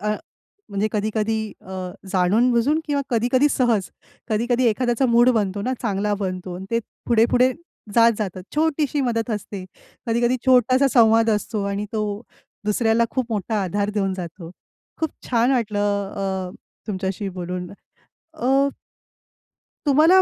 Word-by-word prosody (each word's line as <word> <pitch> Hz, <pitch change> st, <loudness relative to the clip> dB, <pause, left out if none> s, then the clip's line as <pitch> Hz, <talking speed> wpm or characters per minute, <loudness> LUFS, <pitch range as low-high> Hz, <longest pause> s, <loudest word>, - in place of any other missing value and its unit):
अ, 210 Hz, -, -1 dB, 0.6 s
म्हणजे 200 Hz, +2 st, -1 dB
कधी-कधी 215 Hz, +1 st, 0 dB, 0.2 s
अ, -, -, -21 dB, 0.5 s
जाणून-बुजून 235 Hz, -, +3 dB
किंवा 290 Hz, -2 st, 0 dB
कधी-कधी 245 Hz, +4 st, +3 dB
सहज, 230 Hz, -9 st, +1 dB, 0.4 s
कधी-कधी 240 Hz, +3 st, +1 dB
एखाद्याचा 240 Hz, +3 st, +1 dB
मूड 240 Hz, +1 st, +5 dB
बनतो 200 Hz, -1 st, -2 dB
ना, 255 Hz, -, -1 dB
चांगला 210 Hz, -2 st, 0 dB
बनतो 185 Hz, -2 st, -4 dB
अन् 185 Hz, -, -7 dB
ते 230 Hz, -, +2 dB, 0.3 s
पुढे-पुढे 245 Hz, +2 st, +4 dB, 0.4 s
जात 230 Hz, 0 st, +6 dB
जातं. 190 Hz, -4 st, -3 dB
छोटीशी 300 Hz, -2 st, +1 dB
मदत 235 Hz, -3 st, -1 dB
असते, 205 Hz, -3 st, -4 dB, 0.4 s
कधी-कधी 240 Hz, +2 st, +2 dB
छोटासा 255 Hz, +2 st, +5 dB
संवाद 225 Hz, -1 st, +5 dB
असतो 210 Hz, 0 st, -1 dB
आणि 200 Hz, +1 st, -2 dB
तो 210 Hz, -1 st, -2 dB, 0.4 s
दुसऱ्याला 225 Hz, +2 st, +2 dB
खूप 260 Hz, -3 st, -1 dB
मोठा 210 Hz, 0 st, -1 dB
आधार 200 Hz, +3 st, -1 dB
देऊन 195 Hz, -2 st, -1 dB
जातो. 170 Hz, -2 st, -7 dB, 0.5 s
खूप 320 Hz, -2 st, 0 dB, 0.2 s
छान 240 Hz, +1 st, +3 dB
वाटलं 220 Hz, -5 st, 0 dB, 0.3 s
अ, 190 Hz, -2 st, -3 dB, 0.4 s
तुमच्याशी 195 Hz, -1 st, -3 dB
बोलून. 180 Hz, -1 st, -5 dB, 0.6 s
अ 270 Hz, +3 st, +2 dB, 1.2 s
तुम्हाला 315 Hz, +6 st, +6 dB
225 Hz, 130 wpm, -22 LUFS, 200-245 Hz, 1.2 s, जात